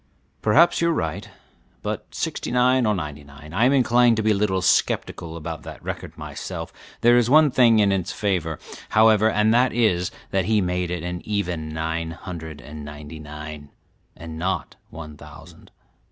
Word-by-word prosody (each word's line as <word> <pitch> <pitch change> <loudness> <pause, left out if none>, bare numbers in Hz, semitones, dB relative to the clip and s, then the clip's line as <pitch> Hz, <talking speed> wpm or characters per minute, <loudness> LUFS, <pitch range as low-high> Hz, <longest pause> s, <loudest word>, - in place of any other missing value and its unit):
"Perhaps 170 +13 +4
you 170 - +3
are - - +2
right, 90 - -3 0.5
but - - -4
sixty - - -3
nine 125 0 +3
or 105 - +2
ninety 75 -4 -5
nine, 70 +2 -13
I 110 +6 +3
am 130 - +4
inclined 120 -3 +4
to 110 - 0
be 110 - +3
a - - +5
little 95 -2 0
sceptical 85 -1 0
about 80 -1 -6
that - - -10
record - - -6
myself; - - -6 0.3
there 120 +1 +6
is 120 -1 +3
one 150 +1 +6
thing 120 -3 +5
in 100 -2 +4
its 95 -1 -1
favor, 90 -6 -1 0.3
however, 110 0 +5
and 110 0 +2
that 125 +2 +3
is, 95 -6 +2 0.2
that 95 -2 +1
he 110 +1 +2
made 90 -2 -1
it 90 -2 -3
an 90 0 -4
even 90 -7 -2
nine 80 +1 -3
hundred 80 -3 -8
and 75 +1 -9
ninety 75 +2 -9
nine, 75 -1 -9 0.5
and 80 -1 -8
not 95 +3 -2
one 75 -2 -9
thousand. 80 +3 -14
90 Hz, 180 wpm, -23 LUFS, 80-110 Hz, 0.5 s, there